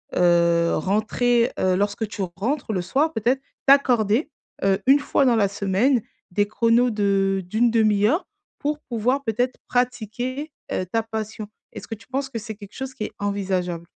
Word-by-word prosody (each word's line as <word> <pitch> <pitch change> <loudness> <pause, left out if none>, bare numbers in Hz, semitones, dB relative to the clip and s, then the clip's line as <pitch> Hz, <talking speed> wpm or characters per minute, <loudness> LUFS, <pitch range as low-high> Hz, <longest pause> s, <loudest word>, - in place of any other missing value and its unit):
heu, 170 -1 +3
rentrer, 230 +6 +1
heu, 185 -1 +2
lorsque 205 +3 -1
tu 205 -1 -4
rentres 240 +3 -2
le 185 - 0
soir, 285 - 0
peut-être 250 +3 +1 0.3
t'accorder, 255 -1 +4 0.3
heu, 195 0 +2
une 275 +2 +7
fois 280 0 +1
dans 245 -2 +4
la 210 -3 +3
semaine, 200 +6 +1 0.3
des 205 +3 +1
chronos 230 +3 +3
de 195 -3 +1
d'1/2 215 0 +3
heure 320 - +1 0.3
pour 295 +1 -2
pouvoir, 250 +1 -1
peut-être, 245 +2 -1
pratiquer, 250 +4 -2 0.2
heu, - - 0
ta 225 +5 0
passion. 220 -1 -5 0.2
Est-ce - - -9
que - - -5
tu 215 - -19
penses 270 +1 -3
que 250 - -5
c'est 220 0 -7
quelque 205 -1 -13
chose 265 0 -5
qui 255 - -4
est - - -7
envisageable? 185 -4 -2
220 Hz, 165 wpm, -23 LUFS, 200-250 Hz, 0.3 s, une